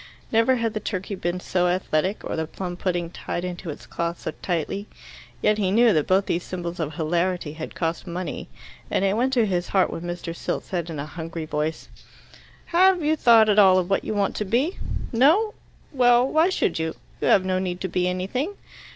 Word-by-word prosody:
Never 230 +3 +4
had 230 -3 -1
the 215 - -2
turkey 200 -1 -4
been 180 -1 -2
so 180 0 0
athletic, 185 +1 0
or - - -3
the 160 -1 -2
plum 180 +2 -5
pudding 175 -2 -2
tied 175 0 -4
into 180 -1 -5
its 150 - -7
cloth 170 0 -3
so - - -4
tightly. 180 +4 -2 0.6
Yet 210 0 +3
he 195 -3 +1
knew 225 +2 +5
that 155 -3 +1
both 190 +1 +3
these 170 - -1
symbols 175 -1 -5
of 155 -2 -3
hilarity 170 0 -1
had 155 0 -7
cost 165 -1 -2
money, 175 +1 -5 0.4
and 195 - +1
it 195 +1 +2
went 250 +4 +1
to 240 -4 +4
his 180 -3 -1
heart 190 -2 +2
when - - -5
Mr. 175 -1 -5
Silt - - -3
said 175 -3 -3
in 160 - -5
a 140 - -4
hungry 165 +1 -6
voice, 155 +1 -3 0.8
"Have 365 0 +4
you 310 +1 +3
thought 230 -6 +6
at 210 0 +4
all 190 -2 +7
of 185 +1 0
what 195 - +2
you 215 - -3
want 200 -1 0
to - - 0
be? 255 - +1 0.4
No? 325 - +4 0.4
Well, 245 -1 +5
why 320 +5 +3
should 375 - 0
you? 160 0 -2 0.3
You - - +1
have 185 - +5
no 185 0 +1
need 180 -1 -3
to 190 - -1
be 180 0 0
anything." 195 - -2
185 Hz, 210 wpm, -24 LUFS, 170-225 Hz, 0.8 s, all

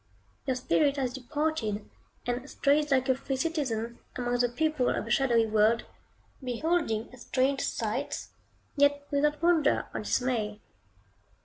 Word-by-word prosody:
Your 260 - +1
spirit 280 +3 +2
has 260 -3 -1
departed, 250 -5 -2 0.4
and 245 +3 -3
strays 295 +1 +2
like 260 -2 +2
a 260 - +5
free 265 +1 -3
citizen, 255 -7 -2 0.2
among 245 -1 0
the 245 0 +3
people 305 0 +1
of - - -1
a - - -5
shadowy 235 -4 +3
world, 220 +2 +3 0.6
beholding 255 -3 -1
strange 260 +3 0
sights, - - -2 0.5
yet 285 0 +3
without 295 +2 +1
wonder 330 -4 +3
or - - -2
dismay. 220 -5 -1
260 Hz, 130 wpm, -29 LUFS, 240-290 Hz, 0.6 s, a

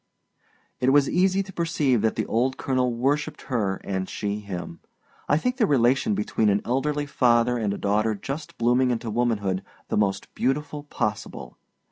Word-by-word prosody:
It 130 +1 +3
was 140 -1 +5
easy 190 +2 +2
to 190 0 -12
perceive 155 -9 +1
that 110 0 +1
the - - -1
old 130 +3 0
colonel 130 -2 0
worshipped 135 +5 -1
her 105 -7 -1
and 95 -1 -3
she 105 0 -3
him. 90 -5 -7 0.5
I 145 - +4
think 250 +9 -1
the 225 -5 +3
relation 135 - +3
between 195 - +1
an 100 0 +1
elderly 145 +4 0
father 125 -3 +3
and 105 -3 0
a 100 - -3
daughter 105 +2 +1
just 140 +9 -6
blooming 125 +2 +3
into 115 -2 -2
womanhood 105 -5 0 0.3
the - - 0
most 100 -2 0
beautiful 145 +2 -2
possible. 105 - -4
125 Hz, 165 wpm, -25 LUFS, 105-145 Hz, 0.5 s, was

